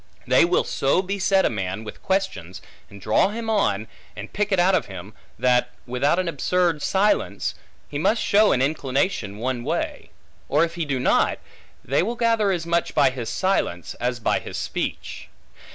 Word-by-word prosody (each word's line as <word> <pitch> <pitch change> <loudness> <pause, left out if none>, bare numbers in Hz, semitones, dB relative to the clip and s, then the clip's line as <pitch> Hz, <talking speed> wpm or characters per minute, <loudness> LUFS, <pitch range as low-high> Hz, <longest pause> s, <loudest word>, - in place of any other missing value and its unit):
They - - +5
will - - +2
so 140 +7 +1
beset 195 0 +1
a - - +3
man 95 0 -3
with 105 - -9
questions, 95 - -2 0.3
and 100 - -12
draw 110 - +3
him 225 +1 -3
on, 110 - +1 0.3
and 105 +1 -9
pick 210 0 -1
it 195 - +3
out 185 +2 +4
of 185 - +1
him, 95 +2 -9 0.2
that, 125 -1 +2 0.2
without 130 +6 +1
an 185 -1 0
absurd 170 0 0
silence, 200 +6 +1 0.3
he 145 - -4
must 215 +8 +2
show 210 +1 +4
an 130 - +2
inclination 135 - -1
one 120 +1 -2
way; 160 +6 -3 0.4
or 150 +3 +3
if 170 0 -1
he 170 -2 -3
do 140 -3 -1
not, - - +2 0.5
they 140 +5 +2
will 225 +7 -2
gather 230 -3 +2
as 175 -3 -2
much 170 0 0
by 140 -4 +4
his 120 -3 -5
silence, 150 - -1
as 125 0 -1
by 110 - +1
his - - -7
speech. - - -4
150 Hz, 180 wpm, -23 LUFS, 120-190 Hz, 0.5 s, They